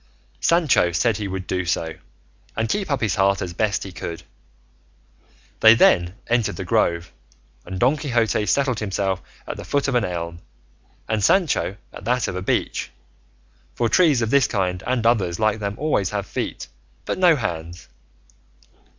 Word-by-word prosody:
Sancho 160 Hz, -, +3 dB
said 105 Hz, +5 st, +1 dB
he 105 Hz, -2 st, -3 dB
would 95 Hz, -1 st, -5 dB
do 90 Hz, 0 st, -1 dB
so, 85 Hz, -2 st, -1 dB, 0.6 s
and 110 Hz, -, 0 dB
keep 200 Hz, -, -1 dB
up 140 Hz, -3 st, 0 dB
his 105 Hz, -6 st, +1 dB
heart 100 Hz, 0 st, +3 dB
as 90 Hz, -2 st, -4 dB
best 100 Hz, +2 st, 0 dB
he 95 Hz, -, -8 dB
could. 85 Hz, 0 st, -7 dB, 1.4 s
They 110 Hz, 0 st, +8 dB
then 85 Hz, -5 st, +4 dB
entered 120 Hz, -2 st, 0 dB
the -, -, -5 dB
grove, 85 Hz, -3 st, 0 dB, 0.5 s
and 95 Hz, +1 st, -5 dB
Don 130 Hz, +5 st, +3 dB
Quixote 120 Hz, -7 st, 0 dB
settled 135 Hz, -5 st, +1 dB
himself 95 Hz, -2 st, -1 dB, 0.2 s
at -, -, -6 dB
the -, -, -7 dB
foot 140 Hz, 0 st, 0 dB
of 135 Hz, -, 0 dB
an 120 Hz, -2 st, +2 dB
elm, 85 Hz, -3 st, -4 dB, 0.7 s
and 110 Hz, -2 st, -1 dB
Sancho 150 Hz, -, +2 dB, 0.2 s
at -, -, -10 dB
that 125 Hz, +1 st, +1 dB
of -, -, -4 dB
a 95 Hz, -, -3 dB
beech, -, -, -1 dB, 0.9 s
for 115 Hz, -, +1 dB
trees 150 Hz, -8 st, +4 dB
of 115 Hz, -, -2 dB
this 140 Hz, -3 st, +4 dB
kind 90 Hz, -3 st, -1 dB
and 125 Hz, -2 st, 0 dB
others 95 Hz, -8 st, +2 dB
like 110 Hz, 0 st, +1 dB
them 100 Hz, -1 st, -3 dB
always 145 Hz, -10 st, 0 dB
have 100 Hz, -1 st, -3 dB
feet -, -, -4 dB, 0.4 s
but -, -, -3 dB
no 175 Hz, -3 st, +6 dB
hands. 85 Hz, -, -5 dB
105 Hz, 170 wpm, -22 LUFS, 90-125 Hz, 1.4 s, They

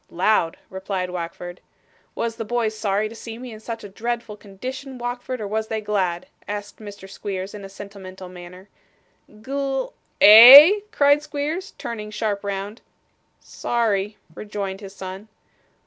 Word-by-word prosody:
'Loud,' 180 Hz, -2 st, +1 dB
replied 190 Hz, -1 st, -4 dB
Wackford. 175 Hz, 0 st, -6 dB, 0.6 s
'Was 230 Hz, -1 st, -3 dB
the 225 Hz, -, -3 dB
boys 225 Hz, -1 st, -1 dB
sorry 210 Hz, 0 st, -1 dB
to 220 Hz, -, -11 dB
see 225 Hz, 0 st, -9 dB
me 250 Hz, 0 st, -9 dB
in 215 Hz, -, -10 dB
such 225 Hz, +1 st, -7 dB
a -, -, -7 dB
dreadful 230 Hz, +2 st, -4 dB
condition, 255 Hz, +7 st, -8 dB
Wackford, 245 Hz, +1 st, -5 dB
or 210 Hz, -, -4 dB
was 220 Hz, +2 st, -2 dB
they 220 Hz, 0 st, -2 dB
glad?' 190 Hz, -5 st, -1 dB, 0.2 s
asked 205 Hz, 0 st, -6 dB
Mr. 200 Hz, -2 st, -10 dB
Squeers, 195 Hz, -1 st, -6 dB
in 205 Hz, -1 st, -9 dB
a 195 Hz, -, -9 dB
sentimental 195 Hz, -2 st, -10 dB
manner. 180 Hz, +1 st, -12 dB, 0.6 s
'Gl 270 Hz, +4 st, -4 dB
' -, -, -43 dB
'Eh?' 270 Hz, -, +11 dB
cried 285 Hz, -6 st, +4 dB
Squeers, 305 Hz, +7 st, -4 dB
turning 210 Hz, -2 st, -6 dB
sharp 210 Hz, -1 st, -3 dB
round. 200 Hz, +2 st, -5 dB, 0.6 s
'Sorry,' 210 Hz, -3 st, -2 dB, 0.2 s
rejoined 200 Hz, 0 st, -6 dB
his 195 Hz, -1 st, -10 dB
son. 190 Hz, +2 st, -8 dB
210 Hz, 145 wpm, -22 LUFS, 195-235 Hz, 0.6 s, Eh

